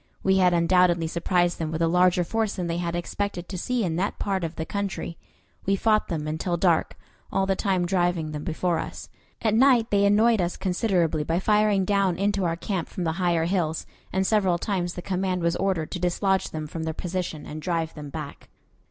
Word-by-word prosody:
We 190 0 +3
had 180 -1 +5
undoubtedly 175 0 +3
surprised 175 +1 0
them 160 -2 -2
with 160 0 -3
a 165 - +2
larger 180 +1 +3
force 220 +3 -1
than 180 - -3
they 170 0 -2
had 170 -1 -2
expected 175 +1 -3
to 195 - -6
see 240 +6 -1
in 165 -3 -1
that 195 +3 -1
part 195 -3 -1
of 165 0 -4
the 160 - -4
country. 200 -3 -3 0.5
We 195 - +3
fought 215 +1 +2
them 155 -4 -3
until 160 +3 -1
dark, 170 -2 +1 0.3
all 195 0 +1
the 195 0 +1
time 185 -2 0
driving 175 -3 0
them 150 -1 -5
before 170 0 -1
us. - - -7 0.3
At 220 -2 +2
night 240 -1 +4
they 200 0 +3
annoyed 215 +1 +4
us 175 0 -2
considerably 180 -5 +1
by 165 +3 0
firing 210 -1 +3
down 195 -3 +1
into 200 -1 0
our 165 -1 0
camp 175 0 -3
from 180 - -4
the 165 - +1
higher 170 -2 +2
hills, 170 -3 -1 0.3
and 190 0 +1
several 190 -4 +2
times 180 -2 -2
the 180 - -6
command 185 -1 -1
was 170 0 +2
ordered 185 -5 -1
to 180 - -4
dislodge 190 +2 +1
them 155 -1 -5
from 160 +2 -6
their 160 -1 -3
position 175 -4 -4
and 155 +1 -7
drive 165 -1 -1
them 150 -2 -8
back. 150 -1 -8
180 Hz, 210 wpm, -25 LUFS, 165-195 Hz, 0.5 s, had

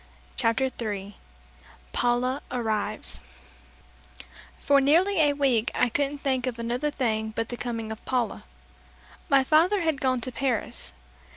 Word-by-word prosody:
CHAPTER 235 +2 +2
THREE 205 -5 -5 0.8
PAULA 250 +3 +1
ARRIVES 220 -4 -1 1.4
For 280 -1 +3
nearly 340 +8 +4
a 295 -2 +5
week 265 -6 +2
I 250 - +3
couldn't 285 +4 -1
think 265 -2 -1
of 245 -2 -3
another 240 +5 -1
thing 220 -6 -1
but 230 -1 -2
the 240 - -3
coming 230 -2 -4
of 220 - -8
Paula. 245 -4 -1 0.9
My 275 -1 +5
father 335 +8 +4
had 320 -4 0
gone 255 -1 +2
to 255 - -4
Paris. 250 -3 -2
255 Hz, 130 wpm, -26 LUFS, 230-280 Hz, 1.4 s, a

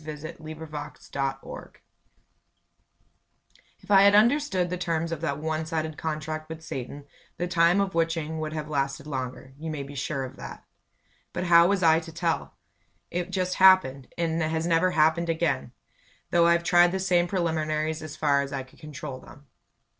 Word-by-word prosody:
WHEN 155 - -8
I 155 +1 -8
WAS 155 -2 -8
A 135 -1 -1
WITCH - - -10 2.0
If - - -8
I 195 -1 +8
had 200 +1 +6
understood 215 - +3
the - - 0
terms 165 -1 -1
of 165 -2 -4
that 165 - -1
one 155 +1 -2
sided 160 -1 -2
contract 155 0 -4
with 160 0 -8
Satan, 140 0 -6 0.3
the 175 - -2
Time 175 +1 +3
of 195 -1 0
Witching 165 -1 -1
would 155 0 -3
have 155 -1 -4
lasted 140 -1 -2
longer 130 -2 -5
you 160 +1 -5
may 150 -3 -4
be 140 +1 -10
sure 135 0 -3
of 130 0 -8
that. - - -9 0.7
But 175 - -2
how 170 -1 +6
was 195 -1 +1
I 160 -1 +6
to 165 0 -10
tell? 165 - -2 0.6
It 175 +1 -2
just 185 -1 -1
happened, 185 -9 +5
and 165 -1 0
has 160 +1 -1
never 170 +2 +3
happened 160 0 +2
again, 160 -7 0 0.6
though 170 -1 +5
I've 170 0 +3
tried 175 0 +5
the 190 - -2
same 180 -2 +2
preliminaries 160 -3 -1
as 155 -1 -7
far 140 -2 +2
as 140 -1 -5
I 135 -1 -3
could 130 - -21
control 145 -3 -7
them. 145 +2 -15
160 Hz, 175 wpm, -26 LUFS, 150-175 Hz, 2.0 s, I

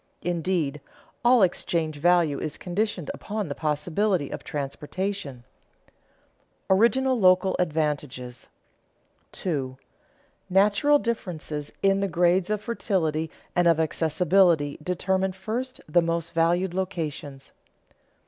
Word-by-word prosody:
Indeed, 170 -4 -1 0.4
all 240 -2 +6
exchange 165 -3 0
value 170 -2 +3
is 155 - -4
conditioned 180 -3 -2
upon 210 -4 -4
the - - -2
possibility 155 +3 0
of - - -6
transportation. 150 0 -4 1.2
[Sidenote: 190 0 +4
Original 260 +2 +3
local 185 -1 +4
advantages] 150 -7 -2 0.8
2. 135 -7 -3 0.7
_Natural 210 +10 +4
differences 160 - -4
in 195 0 +4
the 200 - 0
grades 175 +1 +2
of 210 -1 -1
fertility 165 -8 -1 0.3
and 175 -1 +3
of 165 -1 +4
accessibility 160 0 +2
determine 185 +3 0
first 240 +7 -4
the 175 +3 +4
most 165 0 -2
valued 170 +2 +2
locations. 160 -7 -4
175 Hz, 105 wpm, -25 LUFS, 150-195 Hz, 1.2 s, all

